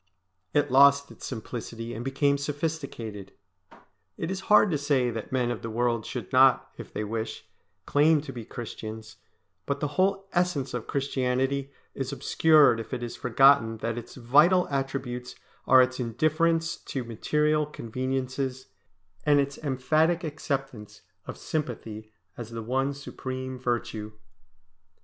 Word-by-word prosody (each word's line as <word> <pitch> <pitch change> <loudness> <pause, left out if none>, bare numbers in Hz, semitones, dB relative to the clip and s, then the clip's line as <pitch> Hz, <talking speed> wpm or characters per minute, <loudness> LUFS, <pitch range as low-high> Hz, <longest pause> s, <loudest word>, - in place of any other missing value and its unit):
It 145 -2 +1
lost 140 +1 +6
its - - -9
simplicity 115 -1 -6
and 115 - -5
became 140 +2 +1
sophisticated. 140 - -4 0.8
It 165 - -3
is 190 - -3
hard 210 -2 +6
to 150 - +1
say 135 -4 +1
that 115 -1 -6
men 125 -2 +1
of 120 - -4
the 115 - -5
world 115 0 0
should - - -6
not, - - +5
if - - -10
they 105 - -3
wish, 110 +1 -4 0.4
claim 150 +2 +4
to 140 -2 -8
be 120 -2 -6
Christians, 110 -1 -8 0.5
but 140 0 -1
the 150 - -1
whole 195 +5 +1
essence 175 -7 0
of 120 -2 -4
Christianity 135 0 -1 0.2
is 135 -1 -4
obscured 140 -1 +4
if 115 +3 -5
it 120 - -5
is 120 - -5
forgotten 125 -2 +4
that 115 +1 -3
its 120 -1 -8
vital 150 +9 +4
attributes 135 -3 -3 0.3
are 130 0 +8
its 130 +1 -3
indifference 155 +7 +1
to 135 - -5
material 150 +6 0
conveniences, 130 0 -3 0.5
and 145 -1 +4
its 140 0 -1
emphatic 155 +5 +1
acceptance 135 -8 -4 0.3
of - - -6
sympathy 110 -7 -5 0.2
as 115 -2 -7
the 115 -1 -6
one 135 +4 0
supreme 130 -2 -6
virtue. 120 -3 -3
130 Hz, 140 wpm, -27 LUFS, 120-145 Hz, 0.8 s, are